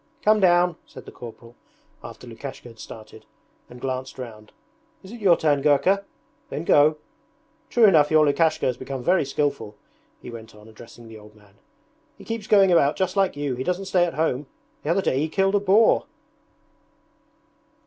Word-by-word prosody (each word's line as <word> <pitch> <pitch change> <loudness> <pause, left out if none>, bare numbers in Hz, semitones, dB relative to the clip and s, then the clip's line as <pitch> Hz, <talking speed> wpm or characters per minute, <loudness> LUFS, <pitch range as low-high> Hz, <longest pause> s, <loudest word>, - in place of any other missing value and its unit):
'Come 215 0 +4
down!' 175 -2 +3
said - - -13
the - - -11
corporal, 120 0 -12 0.5
after - - -11
Lukashka - - -9
had 115 -2 -15
started, 110 0 -12 0.5
and 125 - -12
glanced 130 0 -5
round. 110 -4 -10 0.5
'Is 190 - -12
it 235 -1 -10
your 180 -4 +4
turn, 145 -3 +1
Gurka? 155 +8 +2 0.5
Then 150 - -5
go... 150 -1 +4 0.7
True 235 -2 +4
enough 155 -7 +5
your 155 -1 +4
Lukashka 160 +2 +1
has 125 -2 -1
become 130 -1 -6
very 180 +2 +2
skilful,' 140 -6 -3 0.4
he - - -10
went 115 -1 -11
on, 105 +1 -16
addressing 115 +1 -14
the 110 -1 -12
old 105 0 -17
man. 105 -2 -22 0.6
'He - - -14
keeps 225 -2 -5
going 195 -3 +5
about 150 -4 +3
just 185 0 -2
like 195 -4 +1
you, 145 -2 -2
he 125 +1 -4
doesn't 180 +5 -2
stay 185 -2 +2
at 170 - -5
home. 150 -3 -1 0.3
The 150 - -5
other 190 +3 +1
day 130 - 0
he 155 +2 -1
killed 195 +3 +1
a 205 - +3
boar.' 205 +6 +3
150 Hz, 180 wpm, -23 LUFS, 120-185 Hz, 0.7 s, enough